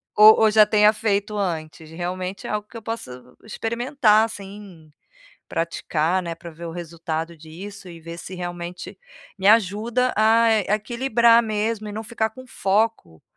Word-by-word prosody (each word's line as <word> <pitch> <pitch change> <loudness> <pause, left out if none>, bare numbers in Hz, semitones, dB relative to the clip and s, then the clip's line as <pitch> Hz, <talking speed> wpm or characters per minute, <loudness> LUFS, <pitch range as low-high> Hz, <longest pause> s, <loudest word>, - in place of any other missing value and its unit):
ou 215 +1 +8
ou 220 -1 +5
já 215 0 +7
tenha 210 0 +4
feito 210 -1 -1
antes, 160 -4 -4
realmente 180 +3 -5
é - - -4
algo 210 0 -3
que 235 - -11
eu 225 - -9
posso 225 - -5 0.3
experimentar 225 0 +1
assim, 200 -6 -10 0.6
praticar, 170 +1 -1
né, 170 -1 -5
para 170 +1 -10
ver 165 +2 -10
o 165 - -5
resultado 165 -1 -5
disso 185 +5 -10
e 170 -1 -11
ver 170 +1 -8
se 185 - -8
realmente 175 0 -7 0.4
me 190 +1 0
ajuda 225 +4 +2
a 225 +1 +4 0.2
equilibrar 235 +1 +3
mesmo 215 0 -2
e - - -6
não 215 +2 -5
ficar 220 -1 -2
com 255 +2 -13
foco, 195 - -1
205 Hz, 155 wpm, -23 LUFS, 170-220 Hz, 0.6 s, ou